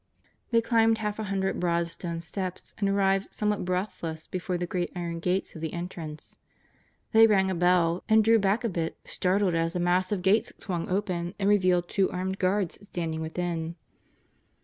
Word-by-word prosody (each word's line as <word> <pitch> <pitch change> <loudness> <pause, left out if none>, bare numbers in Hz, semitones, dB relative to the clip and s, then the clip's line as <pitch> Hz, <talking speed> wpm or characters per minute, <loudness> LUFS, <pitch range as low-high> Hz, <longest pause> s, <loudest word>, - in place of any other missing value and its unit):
They 230 -1 +4
climbed 225 -1 +3
half 210 -1 -3
a 215 - -2
hundred 195 -1 -1
broad 170 -1 +1
stone 170 0 -5
steps 185 +2 -5
and 200 -2 +1
arrived 195 0 +1
somewhat 210 -1 0
breathless 180 -3 -3
before 180 0 -3
the 175 - -2
great 175 0 -2
iron 170 -1 -3
gates 180 +3 -1
of 160 - -9
the 160 -2 -3
entrance. 170 -3 -7 0.7
They 225 0 +7
rang 190 -3 +3
a - - 0
bell, 175 -1 +2
and 220 0 +6
drew 225 +1 +5
back 200 +4 +1
a 230 - +1
bit 165 -3 -3
startled 185 0 +1
as 165 0 0
the 180 - -1
massive 180 +2 +1
gates 205 +4 +3
swung 175 -4 -4
open 180 -2 -1
and 195 - 0
revealed 185 -4 +3
two 195 0 +1
armed 190 +1 -3
guards 185 -1 0
standing 160 -3 -3
within. 165 0 -3
185 Hz, 175 wpm, -27 LUFS, 170-200 Hz, 0.7 s, They